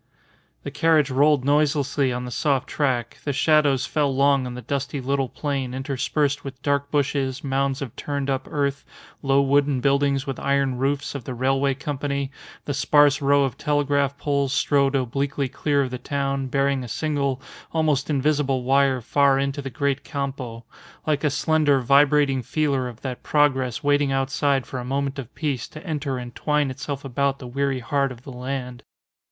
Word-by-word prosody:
The -, -, -5 dB
carriage 155 Hz, -4 st, +3 dB
rolled 140 Hz, 0 st, +3 dB
noiselessly 145 Hz, -2 st, +2 dB
on 125 Hz, 0 st, -3 dB
the 125 Hz, -, -6 dB
soft 135 Hz, +1 st, 0 dB
track, 125 Hz, -5 st, -1 dB
the 145 Hz, -, -1 dB
shadows 145 Hz, -2 st, +3 dB
fell 145 Hz, -2 st, 0 dB
long 140 Hz, -1 st, +2 dB
on 125 Hz, -, -6 dB
the 125 Hz, -, -8 dB
dusty 140 Hz, -1 st, -3 dB
little 135 Hz, 0 st, -1 dB
plain 135 Hz, -4 st, -3 dB
interspersed 140 Hz, +2 st, -1 dB
with 135 Hz, -2 st, -8 dB
dark 140 Hz, 0 st, 0 dB
bushes, 140 Hz, -2 st, -1 dB
mounds 135 Hz, 0 st, 0 dB
of 125 Hz, -, -8 dB
turned 140 Hz, -1 st, -3 dB
up 135 Hz, -1 st, -2 dB
earth, 140 Hz, -1 st, -1 dB, 0.4 s
low 135 Hz, 0 st, +3 dB
wooden 140 Hz, 0 st, +2 dB
buildings 140 Hz, +1 st, +2 dB
with 135 Hz, -2 st, -4 dB
iron 140 Hz, -2 st, 0 dB
roofs 140 Hz, +1 st, -1 dB
of 140 Hz, -3 st, -6 dB
the 130 Hz, -, -5 dB
Railway 135 Hz, +2 st, +1 dB
Company; 140 Hz, 0 st, -3 dB, 0.3 s
the 145 Hz, -, -2 dB
sparse 145 Hz, +1 st, +4 dB
row 140 Hz, 0 st, +4 dB
of 135 Hz, -2 st, -3 dB
telegraph 140 Hz, -1 st, +1 dB
poles 140 Hz, -2 st, 0 dB
strode 140 Hz, -1 st, +2 dB
obliquely 140 Hz, +2 st, -1 dB
clear 140 Hz, +2 st, 0 dB
of 130 Hz, -, -4 dB
the 125 Hz, -, -5 dB
town, 135 Hz, +1 st, -2 dB
bearing 135 Hz, 0 st, +1 dB
a -, -, -6 dB
single, 140 Hz, +1 st, -1 dB, 0.3 s
almost 155 Hz, -3 st, +1 dB
invisible 140 Hz, -2 st, +1 dB
wire 135 Hz, 0 st, +3 dB
far 140 Hz, +3 st, +3 dB
into 140 Hz, +1 st, -1 dB
the 135 Hz, -, -5 dB
great 140 Hz, +2 st, -1 dB
campo 135 Hz, -5 st, -5 dB, 0.4 s
like 150 Hz, -2 st, 0 dB
a 150 Hz, -, +3 dB
slender, 145 Hz, 0 st, +2 dB
vibrating 140 Hz, +1 st, +4 dB
feeler 140 Hz, 0 st, 0 dB
of 120 Hz, -2 st, -10 dB
that 130 Hz, -2 st, -5 dB
progress 135 Hz, -5 st, +1 dB
waiting 145 Hz, -1 st, +2 dB
outside 135 Hz, 0 st, +1 dB
for 130 Hz, -, -6 dB
a -, -, -5 dB
moment 135 Hz, +2 st, -2 dB
of 130 Hz, -1 st, -7 dB
peace 140 Hz, -7 st, -2 dB
to 155 Hz, +4 st, -12 dB
enter 145 Hz, -5 st, -2 dB
and 120 Hz, -1 st, -7 dB
twine 150 Hz, -2 st, 0 dB
itself 140 Hz, +1 st, -5 dB
about 140 Hz, +1 st, 0 dB
the 130 Hz, -, -10 dB
weary 135 Hz, +1 st, -1 dB
heart 140 Hz, +3 st, 0 dB
of 120 Hz, -1 st, -11 dB
the 135 Hz, -, -9 dB
land. 125 Hz, -1 st, -5 dB
140 Hz, 175 wpm, -23 LUFS, 130-145 Hz, 0.4 s, sparse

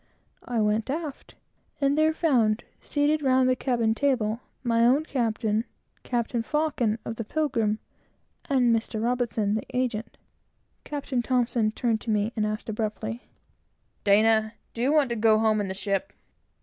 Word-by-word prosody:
I 240 Hz, -2 st, -1 dB
went 210 Hz, +2 st, +1 dB
aft, 300 Hz, -1 st, -5 dB, 0.4 s
and 280 Hz, 0 st, +2 dB
there 310 Hz, +1 st, +4 dB
found, 245 Hz, -10 st, +2 dB, 0.2 s
seated 295 Hz, +1 st, +1 dB
round 260 Hz, -2 st, +3 dB
the 255 Hz, -, +3 dB
cabin 235 Hz, -4 st, +1 dB
table, 230 Hz, -4 st, 0 dB, 0.2 s
my 230 Hz, -2 st, +2 dB
own 265 Hz, +6 st, +4 dB
captain, 225 Hz, -5 st, 0 dB, 0.4 s
Captain 235 Hz, -1 st, -1 dB
Faucon 265 Hz, -5 st, 0 dB
of 225 Hz, -, -5 dB
the 230 Hz, -, -3 dB
Pilgrim, 230 Hz, -5 st, 0 dB, 0.7 s
and 250 Hz, -4 st, +4 dB
Mr. 225 Hz, 0 st, -2 dB
R, 250 Hz, -, +2 dB
the 220 Hz, -3 st, -1 dB
agent. 235 Hz, -3 st, -2 dB, 0.7 s
Captain 280 Hz, -4 st, -2 dB
T 240 Hz, -3 st, +1 dB
turned 225 Hz, -3 st, 0 dB
to 235 Hz, -, -7 dB
me 210 Hz, +1 st, +1 dB
and 215 Hz, -2 st, 0 dB
asked 215 Hz, +1 st, -4 dB
abruptly 220 Hz, +1 st, -4 dB, 0.7 s
"D, 205 Hz, +1 st, +5 dB, 0.5 s
do 230 Hz, -, -5 dB
you 265 Hz, +4 st, +2 dB
want 300 Hz, -4 st, +3 dB
to -, -, 0 dB
go 220 Hz, -1 st, +4 dB
home 215 Hz, -1 st, +2 dB
in 200 Hz, -, -2 dB
the 190 Hz, -, -4 dB
ship?" 200 Hz, +6 st, -2 dB
235 Hz, 150 wpm, -26 LUFS, 215-265 Hz, 0.7 s, D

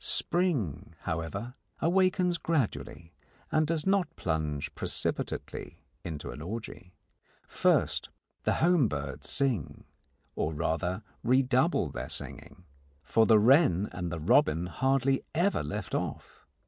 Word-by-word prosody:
Spring, 140 Hz, -, 0 dB
however, 90 Hz, +8 st, -4 dB, 0.3 s
awakens 180 Hz, 0 st, +2 dB
gradually, 95 Hz, -, -2 dB, 0.4 s
and 155 Hz, 0 st, +3 dB
does 160 Hz, -1 st, -1 dB
not 190 Hz, -4 st, +1 dB
plunge 75 Hz, -4 st, -2 dB
precipitately -, -, -3 dB, 0.3 s
into 75 Hz, -6 st, -5 dB
an 70 Hz, +5 st, -8 dB
orgy. 95 Hz, -1 st, -7 dB, 0.5 s
First, -, -, +1 dB, 0.3 s
the -, -, +1 dB
home 170 Hz, -6 st, +4 dB
birds 70 Hz, -5 st, -4 dB
sing, 130 Hz, -, -1 dB, 0.5 s
or 80 Hz, 0 st, -1 dB
rather 90 Hz, +6 st, -1 dB, 0.2 s
redouble 130 Hz, -, +3 dB
their -, -, -5 dB
singing, 90 Hz, -, -7 dB, 0.4 s
for 110 Hz, -, +3 dB
the 110 Hz, -, +7 dB
wren 105 Hz, -, +5 dB
and 90 Hz, -2 st, -4 dB
the 85 Hz, -, -3 dB
robin 90 Hz, -, +3 dB
hardly 135 Hz, +7 st, +1 dB
ever 180 Hz, +5 st, +2 dB
left 75 Hz, 0 st, -5 dB
off. -, -, -4 dB
110 Hz, 115 wpm, -29 LUFS, -, 0.5 s, the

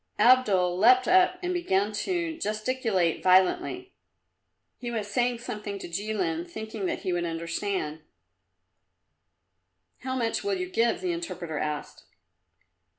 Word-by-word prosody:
Abdul 195 Hz, -8 st, +4 dB
leapt 250 Hz, +4 st, +6 dB
up 365 Hz, 0 st, +4 dB
and 360 Hz, +1 st, -1 dB
began 210 Hz, -, +1 dB
to 335 Hz, -, -2 dB
gesticulate 215 Hz, -, 0 dB
violently. 355 Hz, -, +2 dB, 0.9 s
He 245 Hz, -, -5 dB
was 225 Hz, -3 st, -2 dB
saying 240 Hz, +3 st, 0 dB
something 210 Hz, -4 st, -6 dB
to -, -, -7 dB
Jilin, 180 Hz, -3 st, -2 dB
thinking 220 Hz, +1 st, -5 dB
that -, -, -3 dB
he 185 Hz, -3 st, -1 dB
would 175 Hz, 0 st, 0 dB
understand. 165 Hz, -1 st, -3 dB, 2.0 s
"How 260 Hz, 0 st, -4 dB
much 230 Hz, -3 st, -1 dB
will 405 Hz, -1 st, 0 dB
you 365 Hz, -1 st, -4 dB
give?" 235 Hz, -9 st, +1 dB
the 365 Hz, -, -1 dB
interpreter 175 Hz, -, -5 dB
asked. 150 Hz, -1 st, -4 dB
215 Hz, 125 wpm, -27 LUFS, 185-260 Hz, 2.0 s, leapt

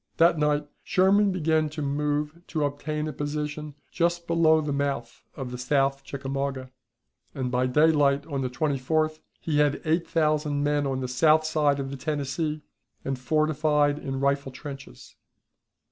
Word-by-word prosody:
That 165 Hz, -1 st, +4 dB
night 150 Hz, 0 st, +1 dB, 0.2 s
Sherman 200 Hz, +1 st, +3 dB
began 160 Hz, -3 st, +1 dB
to 155 Hz, +1 st, -6 dB
move 150 Hz, +3 st, -1 dB
to 155 Hz, -3 st, -1 dB
obtain 150 Hz, +2 st, -3 dB
a 155 Hz, -, -4 dB
position 150 Hz, 0 st, -4 dB, 0.2 s
just 170 Hz, 0 st, 0 dB
below 165 Hz, -2 st, +4 dB
the 150 Hz, -2 st, -2 dB
mouth 140 Hz, -4 st, -3 dB
of 130 Hz, -3 st, -6 dB
the 125 Hz, -, -6 dB
South 135 Hz, +1 st, +1 dB
Chickamauga, 135 Hz, -1 st, -4 dB, 0.6 s
and 130 Hz, -3 st, -2 dB
by 125 Hz, +1 st, +1 dB
daylight 145 Hz, 0 st, +3 dB
on 140 Hz, -4 st, -3 dB
the 130 Hz, -, -1 dB
24th 155 Hz, +4 st, 0 dB, 0.2 s
he 150 Hz, -2 st, 0 dB
had 145 Hz, -1 st, +2 dB
eight 165 Hz, +2 st, +1 dB
thousand 150 Hz, -2 st, +1 dB
men 145 Hz, -1 st, +1 dB
on 130 Hz, -1 st, -2 dB
the 130 Hz, -, -2 dB
south 155 Hz, +5 st, +3 dB
side 150 Hz, -3 st, +2 dB
of 135 Hz, 0 st, -4 dB
the 140 Hz, -, -5 dB
Tennessee, 150 Hz, +2 st, -2 dB, 0.4 s
and 135 Hz, -1 st, -2 dB
fortified 150 Hz, +1 st, +1 dB
in 135 Hz, -2 st, -4 dB
rifle 140 Hz, 0 st, 0 dB
trenches. 135 Hz, -, -10 dB
145 Hz, 155 wpm, -26 LUFS, 135-155 Hz, 0.6 s, That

